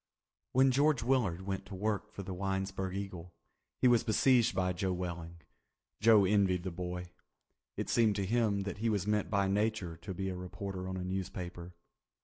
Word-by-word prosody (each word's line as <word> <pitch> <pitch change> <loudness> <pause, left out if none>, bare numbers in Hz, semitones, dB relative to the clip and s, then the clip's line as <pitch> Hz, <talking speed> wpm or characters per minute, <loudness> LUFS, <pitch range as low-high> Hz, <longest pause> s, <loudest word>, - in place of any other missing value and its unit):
When 130 +1 +5
George 140 -2 +3
Willard 115 -9 +1
went 95 -1 -3
to 100 - -7
work 105 +2 -2
for 100 - -7
the 95 0 -5
Winesburg 95 0 -2
Eagle 90 -3 -6 0.4
he - - +4
was 120 -2 +5
besieged 120 -1 +3
by 90 -1 +1
Joe 95 +1 -1
Welling. 85 -2 -5 0.6
Joe 105 -2 +6
envied 95 -3 +2
the 95 - -3
boy. 90 0 -5 0.7
It - - -2
seemed 110 -3 +3
to 100 -1 -1
him 105 -1 +1
that 100 +1 -5
he 115 +1 +1
was 100 -4 0
meant 105 0 0
by 100 -2 +2
Nature 100 -3 0
to 95 +3 -7
be 95 +1 -2
a 95 - -4
reporter 95 +1 -5
on 95 - -3
a 90 - -3
newspaper. 90 -1 -5
95 Hz, 180 wpm, -32 LUFS, 90-105 Hz, 0.7 s, Joe